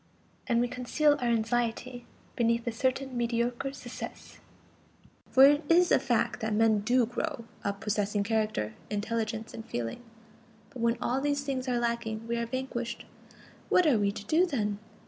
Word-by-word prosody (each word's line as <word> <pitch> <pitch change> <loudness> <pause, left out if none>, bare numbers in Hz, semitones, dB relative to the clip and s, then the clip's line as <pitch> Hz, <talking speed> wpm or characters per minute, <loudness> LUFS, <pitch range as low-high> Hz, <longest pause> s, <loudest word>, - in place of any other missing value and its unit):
And 235 -3 +2
we 245 - +2
conceal 255 +5 +2
our 245 - 0
anxiety 235 +2 -1 0.3
beneath 235 0 +1
a 235 - 0
certain 260 +2 -1
mediocre 240 +2 -1
success, 250 -3 -9 0.9
for 265 - +6
it 290 +2 +5
is 350 +2 +5
a - - +6
fact - - 0
that 220 -2 -1
men 220 -1 +4
do 240 +4 +3
grow 245 +1 -4 0.2
up 200 0 -3
possessing 205 -1 0
character, 215 - -1 0.2
intelligence 220 +1 -2
and 225 - -7
feeling. 120 - -4 0.7
But 250 - -8
when 235 0 +2
all 255 +3 0
these 285 0 0
things 265 -2 -3
are 250 -1 +1
lacking, 235 -2 -2
we 235 - -1
are 235 0 -2
vanquished. 245 -1 -4 0.6
What 360 - +5
are 270 -8 +4
we 200 -1 +2
to 205 0 -8
do 330 - +3
then? 210 - -1
235 Hz, 165 wpm, -29 LUFS, 220-255 Hz, 0.9 s, for